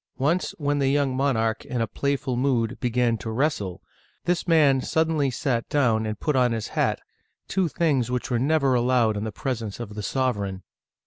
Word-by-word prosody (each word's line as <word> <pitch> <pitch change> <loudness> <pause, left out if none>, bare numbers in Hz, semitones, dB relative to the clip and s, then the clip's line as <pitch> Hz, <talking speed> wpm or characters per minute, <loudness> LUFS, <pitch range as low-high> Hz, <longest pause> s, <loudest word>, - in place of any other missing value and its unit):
Once, 155 +7 0
when 145 -1 0
the 135 - +2
young 140 -2 +1
monarch, 115 -5 0
in 120 -2 -1
playful 140 -2 -1
mood, 125 -2 0
began 120 -2 +1
to 115 - -5
wrestle, 110 - -1 0.4
this 175 +1 0
man 145 -5 +4
suddenly 160 -2 +1
sat 125 -2 -2
down 115 -6 +2
and 110 -1 -4
put 150 - 0
on 125 -2 +3
his 110 -2 -3
hat, - - 0 0.5
two 190 -2 +1
things 145 -7 +1
which 125 +1 -2
were 120 - +2
never 140 0 +2
allowed 120 -3 +2
in 105 +1 -3
the 110 - -3
presence 115 -4 -4
of 110 -3 -6
the 105 - -5
sovereign. 100 -6 -1
125 Hz, 180 wpm, -25 LUFS, 115-140 Hz, 0.5 s, man